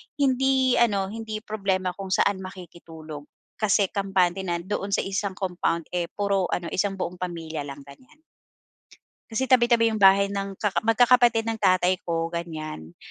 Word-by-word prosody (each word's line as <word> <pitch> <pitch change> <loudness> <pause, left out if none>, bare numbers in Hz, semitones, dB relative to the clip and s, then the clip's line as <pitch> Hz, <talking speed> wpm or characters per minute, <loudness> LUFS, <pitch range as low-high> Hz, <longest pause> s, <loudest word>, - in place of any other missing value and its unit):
hindi 265 -2 +2
ano 200 -4 +1
hindi 220 -1 -6
problema 195 -4 -1
kung 195 +2 -8
saan 190 +1 +2
makikitulog. 165 -5 -10 0.3
Kasi 205 -2 +2
kampante 190 -2 0
na 170 -1 -1
doon 200 +1 -3
sa - - 0
isang 195 0 -2
compound, 175 -3 -1
eh, 175 -1 -1
puro 200 -2 0
ano 170 -1 -2
isang 195 +1 0
buong 180 0 -3
pamilya 165 -4 -5
lang 140 0 -8
ganyan. 255 - -17 1.1
Kasi 245 +4 -1
tabi-tabi 235 -3 +4
yung 215 - -3
bahay 195 +1 +7
ng 200 -1 -4
kaka 210 -3 -1
magkakapatid 235 0 +4
ng 225 -1 -3
tatay 185 0 +3
ko, 165 0 -2
ganyan. 155 - -6
195 Hz, 150 wpm, -25 LUFS, 175-220 Hz, 1.1 s, bahay